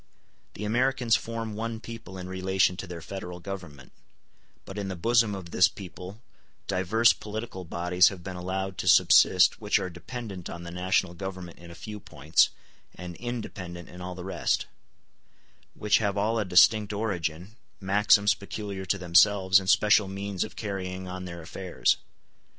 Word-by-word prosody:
The 105 - -5
Americans 120 +1 +2
form 115 -1 -4
one 115 +1 -4
people 115 -5 -9
in 90 -1 -7
relation 95 0 +1
to - - -6
their 85 -2 -8
Federal 90 -1 -7
Government; 85 -8 -8 0.7
but 95 +2 -7
in 100 - -3
the 95 - -4
bosom 115 +3 +2
of 90 -3 -9
this 90 - +5
people 95 +3 -10 0.4
divers 100 +5 +3
political 105 -3 -7
bodies 90 +2 +3
have 90 -3 -10
been 95 0 -6
allowed 95 +1 -4
to - - -3
subsist - - +5
which - - +2
are 90 - -3
dependent 95 0 -7
on 85 - -7
the 85 - -8
national 90 0 0
Government 95 -1 -7
in 85 0 -12
a 85 - -11
few 105 +6 -8
points, 75 -3 +2 0.5
and 90 -1 -8
independent 95 -8 -6
in 90 - -11
all 90 0 -6
the 90 0 -8
rest; 95 - 0 1.1
which 105 -1 +2
have 100 -2 -1
all 110 +3 +1
a 105 - -1
distinct 105 +4 +5
origin, 95 -2 -3 0.2
maxims 100 +1 +4
peculiar 100 0 -6
to 95 +3 0
themselves, 95 +1 +5
and 95 -1 -5
special 105 0 +4
means 100 0 -3
of 110 - -9
carrying 95 -2 -5
on 90 0 -6
their 85 -2 -8
affairs. 90 +2 0
95 Hz, 160 wpm, -27 LUFS, 90-105 Hz, 1.1 s, this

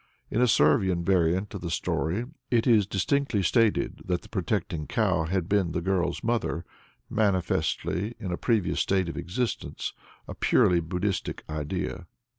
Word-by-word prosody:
In 115 - +1
a 125 - +5
Servian 85 0 +3
variant 95 +2 +2
of 100 - -5
the 85 - -4
story, 85 - -1 0.2
it 115 -2 +2
is 110 -6 +4
distinctly 105 +2 0
stated 115 +2 +2
that 90 -1 -1
the - - -15
protecting 85 -4 -2
cow 95 -9 +1
had 90 0 -1
been 95 -5 +1
the 85 - 0
girl's 90 -1 0
mother 110 -8 -1 0.4
manifestly 100 0 0
in 95 -5 -4
a - - 0
previous 110 -1 +1
state 95 -3 +1
of - - -6
existence, 110 +8 -3 0.3
a - - -6
purely 90 -1 +3
Buddhistic 90 +4 -2
idea. 85 +3 -4
95 Hz, 150 wpm, -27 LUFS, 85-105 Hz, 0.4 s, a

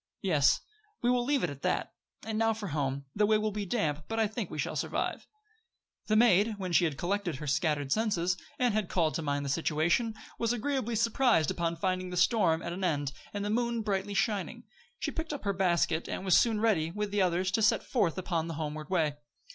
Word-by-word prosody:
"Yes. 150 -7 +3 0.4
We 240 - +4
will 250 -1 +2
leave 280 +1 +1
it - - 0
at 140 -1 -10
that. - - -1 0.3
And 220 -1 -2
now 225 0 +3
for 210 -3 -5
home. 140 -2 -2
The 210 0 +3
way 215 0 +4
will 215 0 -1
be 205 -1 -4
damp, 155 -8 -1
but 225 0 -2
I 220 - +4
think 215 - -4
we - - -7
shall - - -2
survive." - - -2 0.8
The 215 - +2
maid, 215 -1 +4
when 185 -2 -4
she 175 +1 +4
had 150 -4 -2
collected 185 -2 -1
her 150 +3 -7
scattered 145 -1 0
senses, 185 -4 +1 0.2
and 245 -3 +2
had 215 -4 -1
called 165 -4 +1
to - - -2
mind 145 -2 -1
the - - -3
situation, 165 - +1 0.2
was 230 0 +1
agreeably 245 -1 -1
surprised 230 - +3
upon 170 -1 -1
finding 185 +1 -1
the 180 - -5
storm 180 -4 +3
at 170 - -4
an 190 +2 -5
end, 145 -5 0 0.2
and 205 0 -3
the 205 - -1
moon 235 0 0
brightly 200 -1 -2
shining. 205 -2 -1 0.3
She - - -3
picked 320 -1 -4
up 285 - -6
her 200 -1 0
basket, 170 -3 +1
and 190 - -4
was 185 - +5
soon 225 -3 +3
ready, 200 -8 +2
with 210 +3 -3
the 205 -1 +1
others, 185 +1 +1
to 220 - +1
set 215 - +3
forth 195 - 0
upon 170 -3 -1
the 165 - -5
homeward 155 -1 -5
way. 155 -6 +1
190 Hz, 220 wpm, -30 LUFS, 160-220 Hz, 0.8 s, was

